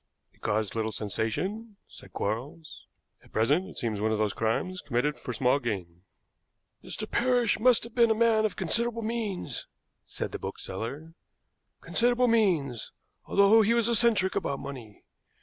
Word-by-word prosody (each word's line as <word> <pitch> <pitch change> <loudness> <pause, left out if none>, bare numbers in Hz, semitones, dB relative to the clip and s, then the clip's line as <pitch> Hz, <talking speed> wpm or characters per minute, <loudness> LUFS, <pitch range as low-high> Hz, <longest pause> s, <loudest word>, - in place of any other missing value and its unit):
"It - - -30
caused 110 -1 -1
little 110 -1 -1
sensation," 185 - -3
said - - -14
Quarles. 130 +10 -5 0.4
"At - - -21
present 145 +12 +2
it - - -12
seems 110 -4 -2
one 110 +1 +1
of 110 - +1
those 105 -2 0
crimes 145 - -1
committed 145 +3 0
for - - -6
small 125 +3 +2
gain." 95 -9 -4 0.8
"Mr. - - -5
Parrish 245 -3 +2
must 245 +1 +4
have 230 0 -9
been 235 -2 +4
a 220 - +3
man 225 -1 +3
of 215 -4 0
considerable 230 +5 -1
means," 210 - -3 0.4
said - - -5
the - - -5
bookseller; 135 +12 -6 0.7
"considerable 245 +1 +2
means, 170 - +1 0.3
although 200 +3 +5
he 225 +2 +3
was 235 -1 +2
eccentric 225 -5 +3
about 140 - -1
money. 130 -7 -9
165 Hz, 150 wpm, -28 LUFS, -, 0.8 s, although